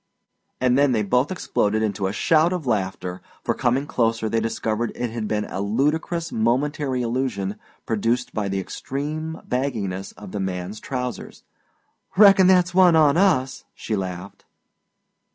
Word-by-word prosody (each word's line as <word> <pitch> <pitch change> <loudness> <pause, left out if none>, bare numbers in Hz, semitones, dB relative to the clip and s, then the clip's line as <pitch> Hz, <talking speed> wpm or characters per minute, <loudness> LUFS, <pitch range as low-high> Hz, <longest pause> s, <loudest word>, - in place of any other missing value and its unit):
And 125 +1 +3
then 140 -2 +4
they 110 -2 +1
both 125 - +1
exploded 110 - 0
into 100 -2 -1
a - - -2
shout 160 - +3
of 175 -5 -4
laughter, 95 -5 -2 0.2
for - - 0
coming 125 +3 0
closer 115 -6 0
they 115 - +1
discovered 115 0 -2
it 120 -1 -3
had 110 -2 -4
been 105 0 -1
a 95 - -5
ludicrous 150 - -1
momentary 130 +3 0
illusion 115 -5 -2 0.3
produced 115 +3 -1
by 105 -2 -2
the 95 0 -1
extreme 150 - -5
bagginess 110 -8 -2
of 105 -3 -11
the 105 - -4
man's 95 +2 -4
trousers. 125 -3 -5 0.7
"Reckon 195 -2 +7
that's 180 -1 +4
one 180 -2 +6
on 150 -2 +5
us," 160 -9 +2
she 110 - -3
laughed. 95 0 -6
120 Hz, 150 wpm, -23 LUFS, 105-145 Hz, 0.7 s, Reckon